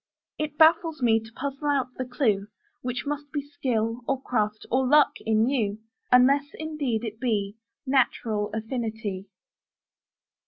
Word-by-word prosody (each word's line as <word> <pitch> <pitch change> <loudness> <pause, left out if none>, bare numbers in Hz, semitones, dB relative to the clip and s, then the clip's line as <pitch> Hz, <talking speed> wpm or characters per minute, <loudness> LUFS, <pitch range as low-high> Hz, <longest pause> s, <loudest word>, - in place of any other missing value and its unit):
It 300 -1 -3
baffles 320 -2 +4
me 225 -2 +4
to 225 0 -13
puzzle 275 +4 -4
out 265 -3 +1
the 255 - -3
clue, 220 -6 0 0.3
Which 250 +2 -3
must 290 0 -4
be 290 -2 -2
skill, 235 -5 -1
or 270 -1 0
craft, 215 -5 -1
or 260 +1 +2
luck 295 +2 +6 0.2
in 220 +1 +3
you: 220 -7 0 0.3
Unless, 270 +3 +5
indeed, 295 -8 -2
it 220 -1 -5
be 210 -5 -1 0.3
Natural 230 -5 +1
affinity. 220 -3 -4
250 Hz, 135 wpm, -26 LUFS, 220-280 Hz, 0.3 s, luck